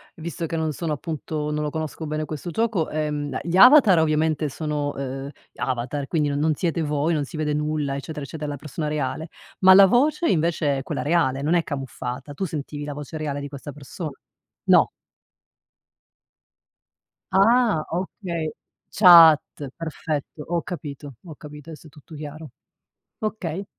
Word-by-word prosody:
visto 165 0 -5
che 165 - -4
non 160 -1 -1
sono 160 +1 -3
appunto 150 0 -4
non 150 0 -1
lo 150 - -1
conosco 160 +1 -5
bene 155 +1 -2
questo 155 +2 -6
gioco, 210 -3 0
ehm, 150 -3 -2
gli 175 +2 -1
avatar 245 - +8
ovviamente 155 -1 +1
sono, 150 0 -3
ehm, 135 0 -5 0.3
avatar, 130 +2 -3
quindi 150 -1 0
non 140 0 -1
non 155 +1 +2
siete 165 +1 -1
voi, 150 +1 0
non 150 -3 0
si 155 - -9
vede 150 -1 -1
nulla 150 -2 -1
eccetera, 145 +1 -6
eccetera, 150 +1 -6
la 145 - -3
persona 150 +2 -5
reale, 150 +1 -2 0.3
ma 190 0 +8
la 200 0 +9
voce 290 - +2
invece 160 -4 +1
è - - -6
quella - - -3
reale 145 -4 +1
non 155 +4 +1
è 175 - +4
camuffata? 135 -1 -6
Tu 190 +7 -3
sentivi 145 -2 -5
la 145 - -5
voce 150 +2 -7
reale 145 -2 -3
di 140 - -5
questa 140 +1 -8
persona? 150 +4 -7 0.6
No. - - +5 2.4
Ah 220 -3 +4
okay, 170 -2 -3 0.4
chat, 170 -6 +8 0.3
perfetto 155 -2 -5
ho 170 0 0
capito, 145 -6 -7
ho 160 -3 -9
capito, 150 +1 -11
adesso 160 0 -11
è - - -15
tutto 150 +2 -16
chiaro 150 0 -8 0.7
okay. 195 -4 -3
155 Hz, 160 wpm, -23 LUFS, 145-165 Hz, 2.4 s, la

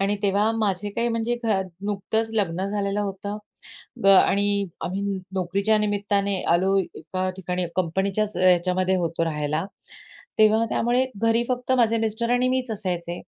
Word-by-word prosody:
आणि 200 +1 +1
तेव्हा 205 +2 +2
माझे 205 -2 -1
काही 235 +3 -1
म्हणजे 230 +1 -1
घर 205 -4 +2 0.2
नुकतंच 220 +2 -1
लग्न 190 -4 0
झालेलं 200 0 -1
होतं 200 +1 -4 0.7
ब - - +3
आणि 200 +1 +4 0.2
आम्ही 185 +3 -3 0.3
नोकरीच्या 195 +4 +1
निमित्ताने 200 -2 0
आलो 190 +3 +2
एका 185 +1 -4
ठिकाणी, 180 -1 -2
कंपनीच्याच 190 +4 -1
याच्यामध्ये 185 +1 +3
होतो 165 -1 -1
राहायला. 155 +1 -1 0.7
तेव्हा 220 +1 +5
त्यामुळे 245 +2 +1 0.2
घरी 230 +1 +3
फक्त 250 0 -1
माझे 230 -2 +3
मिस्टर 225 +1 -1
आणि 245 +1 +2
मीच 255 -2 -1
असायचे. 175 -4 -3
200 Hz, 140 wpm, -24 LUFS, 185-220 Hz, 0.7 s, तेव्हा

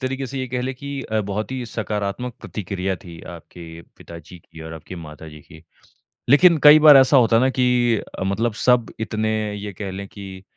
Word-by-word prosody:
तरीके 135 +1 -3
से 135 +1 -6
ये 130 - -3
कह 125 +1 -3
लें 130 +1 -4
कि 140 +1 -7
अ, 110 -3 -2
बहुत 105 +2 -4
ही 130 -2 -4
सकारात्मक 110 +2 -4
प्रतिक्रिया 95 -2 -4
थी 85 -2 -11
आपके 85 +1 -13 0.3
पिताजी 85 +1 -13
की 80 -1 -16
और 80 - -9
आपकी 80 +3 -10
माताजी 75 -2 -11
की, 80 +2 -17 0.7
लेकिन 165 +5 +6
कई 150 +1 +9
बार 150 -2 +8
ऐसा 135 +1 +5
होता 115 -2 +4
है 115 - +4
ना 130 - +3
कि 125 -2 +1 0.2
अ, - - -2
मतलब 105 +4 -1
सब 125 -2 +3
इतने, 110 -1 -2
ये 105 0 -7
कह 95 +1 -6
लें 100 +1 -7
कि 95 -2 -11
110 Hz, 200 wpm, -21 LUFS, 95-125 Hz, 0.7 s, कई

